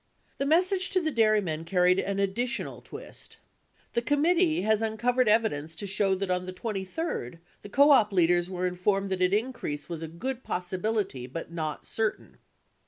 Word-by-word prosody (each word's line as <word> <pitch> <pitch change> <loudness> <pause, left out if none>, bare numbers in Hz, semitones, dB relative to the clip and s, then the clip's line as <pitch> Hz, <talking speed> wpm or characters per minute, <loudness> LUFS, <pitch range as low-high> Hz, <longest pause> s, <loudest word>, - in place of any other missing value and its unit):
The 275 - 0
message 365 +4 +3
to 375 - +2
the 320 -3 -1
dairymen 215 - +2
carried 180 +2 +3
an 200 0 -2
additional 235 +6 -2
twist. - - -8 0.6
The 235 - +1
committee 315 - +2
has 220 +1 +2
uncovered 240 +3 +1
evidence 210 -8 +1
to 180 - -6
show 195 0 +1
that 190 0 -2
on 180 0 -1
the 185 - -5
23d 195 - -4 0.2
the 205 - -10
co 285 +7 +5
op 225 -7 +5
leaders 175 -1 +3
were 185 -1 -2
informed 195 +2 0
that 185 -1 -1
an 180 0 +3
increase 205 - -2
was 165 -2 -5
a 165 - -4
good 235 +11 -4
possibility 185 - -2
but 165 +5 -7
not 155 -3 -4
certain. 220 -1 -3
200 Hz, 170 wpm, -28 LUFS, 180-240 Hz, 0.6 s, co